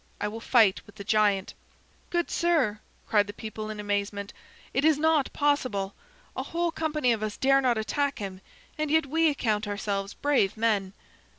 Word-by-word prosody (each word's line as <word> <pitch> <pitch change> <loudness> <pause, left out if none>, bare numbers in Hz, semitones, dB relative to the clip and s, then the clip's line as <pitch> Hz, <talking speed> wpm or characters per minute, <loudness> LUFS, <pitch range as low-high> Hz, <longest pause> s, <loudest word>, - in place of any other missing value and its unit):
I 210 - -1
will 220 +2 -6
fight 225 -4 +4
with 205 - -16
the 200 - -8
giant." 205 -2 +2 0.6
"Good 345 -1 -1
sir," 310 -12 +1 0.3
cried 205 -2 +3
the 205 - -6
people 215 -1 -6
in 215 -1 -6
amazement, 205 0 -2 0.4
"it 270 - +1
is 310 -1 +5
not 315 -2 +2
possible! 255 -10 0 0.4
A - - -2
whole 340 0 -1
company 305 -6 0
of 225 -2 0
us 215 -1 -3
dare 275 +1 +4
not 245 -3 +2
attack 280 +6 -1
him, 190 -2 -6 0.4
and 305 -1 0
yet 315 +1 +3
we 320 +3 +2
account 220 -7 -1
ourselves 200 0 -3
brave 270 -9 +1
men." 210 -4 +1
220 Hz, 175 wpm, -27 LUFS, 205-290 Hz, 0.6 s, is